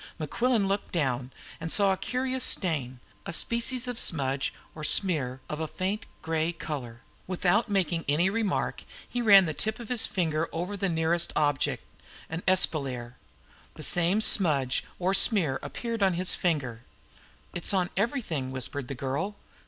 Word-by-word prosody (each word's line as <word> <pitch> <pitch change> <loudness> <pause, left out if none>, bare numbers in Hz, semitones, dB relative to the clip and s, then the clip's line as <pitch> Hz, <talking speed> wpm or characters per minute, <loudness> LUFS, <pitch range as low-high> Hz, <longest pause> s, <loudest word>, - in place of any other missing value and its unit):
Mequillen 225 - 0
looked 200 +1 -2
down, 130 -6 -1 0.3
and 165 0 -4
saw 200 -2 +3
a - - -1
curious 255 +4 -2
stain 140 -9 0 0.3
a - - -3
species 235 +7 0
of 245 -2 -3
smudge 135 -3 0 0.2
or 155 - -9
smear 145 -7 +2
of 150 - -5
a 160 - -2
faint 195 +6 -3 0.2
grey 160 0 0
colour. 130 -8 -7 0.3
Without 185 +4 +1
making 180 -4 0
any 160 +5 +3
remark 215 0 -1 0.2
he 245 - -3
ran 200 -4 +7
the 155 - -2
tip 220 +8 -3
of 235 - -9
his 245 -3 +5
finger 165 -3 -1
along 180 +5 -4
the 195 -1 -1
nearest 165 +1 +1
object, 145 -3 0 0.5
an 165 +2 -3
espalier. 135 -9 +1 0.6
The - - -9
same 175 +5 +3
smudge 145 - +4
or 185 +2 0
smear 185 - +5
appeared 230 -2 -5
on 190 -3 +3
his 180 +1 0
finger. 135 -10 -1 0.7
"It's 175 - 0
on 185 -3 0
everything," 200 - -2
whispered 130 +1 -3
the 140 - -5
girl. 140 - -3
170 Hz, 155 wpm, -27 LUFS, 145-200 Hz, 0.7 s, ran